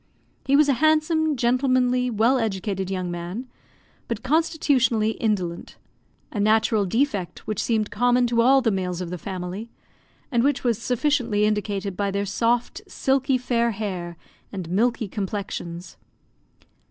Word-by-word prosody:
He 275 - +4
was 295 0 +5
a 280 - +4
handsome, 315 -1 +2
gentlemanly, 250 0 +2
well 235 +4 +2
educated 195 -3 -2
young 185 -2 -3
man, 175 +9 -5 0.6
but 230 -2 -4
constitutionally 260 -7 +2
indolent 195 -7 -2 0.5
a 210 - -4
natural 215 0 +3
defect 210 -4 -1
which 215 -2 -2
seemed 220 -3 0
common 245 +3 +3
to 235 -1 +2
all 265 +2 +5
the 225 - +2
males 180 -2 -2
of 180 -2 -5
the 180 - -5
family, 190 +5 -6 0.6
and 240 -2 +2
which 285 0 +1
was 235 -4 +1
sufficiently 245 -5 +1
indicated 205 -2 -1
by 200 +1 -1
their 200 +1 -1
soft, 235 - 0
silky, 270 -6 +1
fair 235 -2 0
hair 185 -5 -5 0.3
and 185 -4 -6
milky 225 +3 +1
complexions. 190 -3 -5
225 Hz, 140 wpm, -24 LUFS, 195-250 Hz, 0.6 s, was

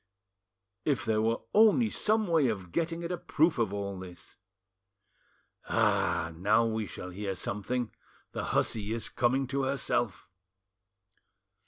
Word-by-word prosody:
If 135 -8 0
there 110 -1 +2
were 115 +1 +1
only 220 +2 +5
some 215 0 +2
way 165 -6 +3
of 95 -6 -3
getting 165 - -1
at 170 - -3
a 180 - -2
proof 160 -3 +2
of 110 -4 +1
all 100 -1 -4
this! 90 -1 -11 1.3
Ah! 80 - +2
now 105 +7 +3
we 110 -2 -1
shall 90 +2 -7
hear 95 +1 -4
something; 110 +6 -2 0.4
the - - -4
hussy 110 0 0
is 110 -2 -3
coming 130 +3 +1
to 140 +1 0
herself." 130 -7 -1
115 Hz, 135 wpm, -30 LUFS, 100-150 Hz, 1.3 s, only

